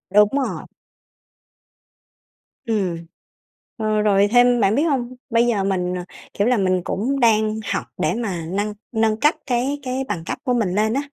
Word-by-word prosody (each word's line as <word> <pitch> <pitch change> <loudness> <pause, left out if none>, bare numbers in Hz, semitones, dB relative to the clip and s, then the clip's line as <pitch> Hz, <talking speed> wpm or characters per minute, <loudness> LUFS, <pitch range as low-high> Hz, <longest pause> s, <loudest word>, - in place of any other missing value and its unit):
Đúng 210 0 +7
rồi. 275 -1 -2 2.0
Ừm. 200 -7 0 0.8
Ờ, 215 -1 0
rồi 200 -1 +4
thêm 245 0 +5
bạn 200 +3 +3
biết 295 - +2
hông? 255 -6 -1 0.2
Bây 235 +1 +3
giờ 205 -5 +1
mình, 180 -2 -1
ờ, 180 - -4 0.3
kiểu 205 +3 +1
là, 250 -2 +3
mình 185 -2 +1
cũng 265 +8 -1
đang 220 -2 +3
học - - -1 0.2
để - - +1
mà 195 -8 -3
nâng 205 +2 -1 0.2
nâng 220 0 +2
cấp 300 +2 +3
cái 265 +3 -1
cái 260 +1 -2
bằng 180 -6 -3
cấp - - -3
của 250 -3 0
mình 205 -6 0
lên 220 +2 +2
á, 275 - 0
220 Hz, 175 wpm, -21 LUFS, 200-245 Hz, 2.0 s, Đúng